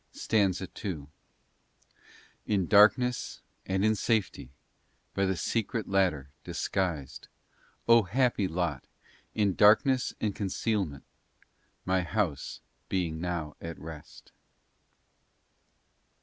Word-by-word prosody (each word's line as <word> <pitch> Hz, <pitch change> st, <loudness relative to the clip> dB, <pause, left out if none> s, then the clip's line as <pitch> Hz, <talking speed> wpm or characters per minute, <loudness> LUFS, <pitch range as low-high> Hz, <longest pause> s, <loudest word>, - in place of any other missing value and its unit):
STANZA 95 Hz, -3 st, +1 dB, 0.2 s
IL 75 Hz, -7 st, -5 dB, 1.4 s
In 100 Hz, -4 st, +1 dB
darkness, 110 Hz, +5 st, +4 dB, 0.3 s
and 95 Hz, +2 st, +1 dB
in 110 Hz, -, +4 dB
safety, 105 Hz, -, -1 dB, 0.6 s
By 100 Hz, 0 st, +1 dB
the 95 Hz, -, 0 dB
secret 110 Hz, +5 st, -2 dB
ladder, 90 Hz, -8 st, +1 dB
disguised, 85 Hz, -8 st, -3 dB, 0.6 s
O 115 Hz, 0 st, +7 dB
happy 110 Hz, 0 st, +1 dB
lot! 85 Hz, -5 st, -2 dB, 0.5 s
In 105 Hz, -3 st, +2 dB
darkness 110 Hz, +6 st, +4 dB
and 105 Hz, -2 st, -1 dB
concealment, 95 Hz, -6 st, -2 dB, 0.8 s
My 95 Hz, 0 st, +2 dB
house 90 Hz, -5 st, -2 dB, 0.3 s
being 85 Hz, -4 st, -1 dB
now 85 Hz, -4 st, -3 dB
at 85 Hz, 0 st, -6 dB
rest. 80 Hz, -2 st, -11 dB
95 Hz, 90 wpm, -29 LUFS, 85-105 Hz, 1.4 s, O